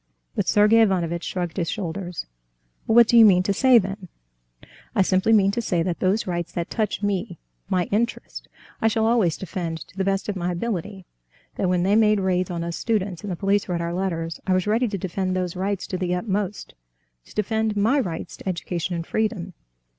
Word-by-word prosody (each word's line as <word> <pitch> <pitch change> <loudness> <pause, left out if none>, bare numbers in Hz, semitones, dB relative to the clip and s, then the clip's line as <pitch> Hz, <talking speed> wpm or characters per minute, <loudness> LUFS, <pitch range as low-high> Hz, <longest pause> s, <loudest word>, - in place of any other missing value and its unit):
But - - -1
Sergey 210 +2 +5
Ivanovitch 175 -5 +1
shrugged 175 -3 -4
his 170 -3 -1
shoulders. 180 -3 -4 0.6
"Well, 220 - +2
what 235 -1 +8
do 240 - +2
you 230 - +10
mean 185 -4 +6
to 200 - +1
say, 260 +3 +5
then?" 195 -2 -2 0.9
"I 195 - +4
simply 190 +4 +2
mean 200 -3 +5
to 235 - -2
say 175 -6 0
that 175 -1 -2
those 195 +4 +1
rights 175 -2 -3
that 170 0 -4
touch 215 -2 -1
me... 200 -2 -2 0.3
my 185 -2 +2
interest, 230 +3 -2 0.3
I 225 - +4
shall 220 0 +1
always 225 -8 +2
defend 170 -3 -4
to - - -20
the 195 - -1
best 195 0 -1
of 205 - -2
my 180 -1 -2
ability; 195 -1 -4 0.5
that 185 - -1
when 180 -1 +2
they 195 +3 +3
made 215 -1 +4
raids 185 -1 0
on 170 -1 -3
us 170 0 -4
students, 200 -6 -1
and 205 - -4
the - - -2
police 200 +2 0
read 175 -1 -1
our 170 0 -2
letters, 165 -3 -3
I 190 - +3
was 185 - 0
ready 225 +4 +2
to 205 -2 -3
defend 185 +1 -2
those 180 -1 -2
rights 195 +1 -2
to 185 - -4
the 180 -1 0
utmost, 200 +1 -3 0.5
to - - -17
defend 220 0 0
my 230 +8 +3
rights 170 -10 -4
to - - -5
education 175 0 -3
and 165 -1 -4
freedom. 210 -4 -2
190 Hz, 205 wpm, -23 LUFS, 175-210 Hz, 0.9 s, you